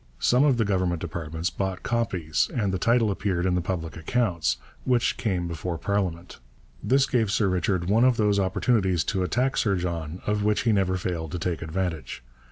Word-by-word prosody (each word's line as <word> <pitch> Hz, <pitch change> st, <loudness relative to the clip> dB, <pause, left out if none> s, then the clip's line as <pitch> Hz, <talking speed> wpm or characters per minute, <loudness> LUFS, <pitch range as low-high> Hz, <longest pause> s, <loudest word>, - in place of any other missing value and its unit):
Some 125 Hz, -, +3 dB
of 140 Hz, -4 st, +3 dB
the 115 Hz, -, +2 dB
government 90 Hz, -4 st, 0 dB
departments 80 Hz, 0 st, -4 dB
bought 95 Hz, -1 st, -3 dB
copies 95 Hz, -10 st, 0 dB
and 105 Hz, -6 st, 0 dB
the 95 Hz, -, -1 dB
title 115 Hz, +1 st, +3 dB
appeared 95 Hz, -3 st, -1 dB
in 90 Hz, -, +2 dB
the 90 Hz, -, +1 dB
public 85 Hz, -3 st, -4 dB
accounts, 85 Hz, -, 0 dB, 0.3 s
which 120 Hz, -2 st, +2 dB
came 95 Hz, -6 st, -1 dB
before 85 Hz, +1 st, -4 dB
parliament. 90 Hz, -4 st, -2 dB, 0.4 s
This 135 Hz, +1 st, +3 dB
gave 120 Hz, -6 st, +1 dB
Sir 105 Hz, -1 st, +2 dB
Richard 90 Hz, -1 st, 0 dB
one 110 Hz, +5 st, +3 dB
of 130 Hz, -2 st, +4 dB
those 105 Hz, -2 st, +2 dB
opportunities 95 Hz, -2 st, +1 dB
to 95 Hz, -3 st, -1 dB
attack 125 Hz, +8 st, 0 dB
Sir 100 Hz, -3 st, +2 dB
John 85 Hz, -2 st, -3 dB
of 105 Hz, 0 st, 0 dB
which 105 Hz, 0 st, +2 dB
he 115 Hz, -, +2 dB
never 95 Hz, -3 st, +1 dB
failed 85 Hz, -4 st, -3 dB
to -, -, -1 dB
take 85 Hz, 0 st, -2 dB
advantage. 80 Hz, -6 st, -4 dB
95 Hz, 185 wpm, -26 LUFS, 85-105 Hz, 0.4 s, of